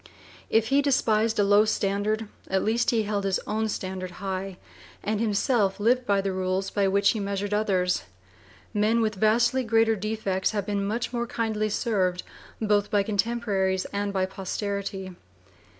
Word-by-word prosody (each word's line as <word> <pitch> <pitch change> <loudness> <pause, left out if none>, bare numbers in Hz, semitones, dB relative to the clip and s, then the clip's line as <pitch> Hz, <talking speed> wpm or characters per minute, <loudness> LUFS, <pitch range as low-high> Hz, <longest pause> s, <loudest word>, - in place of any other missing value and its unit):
If 225 0 +2
he 275 +1 +4
despised 230 -5 +2
a 205 - +4
low 205 +1 +5
standard, 215 +1 0 0.2
at 190 0 0
least 230 +3 +1
he 225 -2 +2
held 205 -1 -2
his 195 -1 +1
own 220 +1 -1
standard 185 -2 -4
high, 190 -1 -4 0.5
and 215 0 -1
himself 210 -2 +1
lived 245 +4 +2
by 200 -1 +3
the 195 0 -2
rules 185 +1 -1
by 200 -1 +1
which 200 +1 +3
he 220 - -3
measured 200 0 -2
others. 185 - +1 0.7
Men 215 +2 +2
with 220 -1 +1
vastly 235 +5 +2
greater 225 -1 +3
defects 210 -2 -1
have 200 - -1
been 200 -1 -1
much 230 +5 -2
more 235 0 -1
kindly 220 -2 -1
served 190 -4 0 0.4
both 205 -2 +1
by 205 -1 +2
contemporaries 200 -3 0
and 200 0 -1
by 190 -1 +1
posterity. 195 0 -4
205 Hz, 160 wpm, -26 LUFS, 195-220 Hz, 0.7 s, low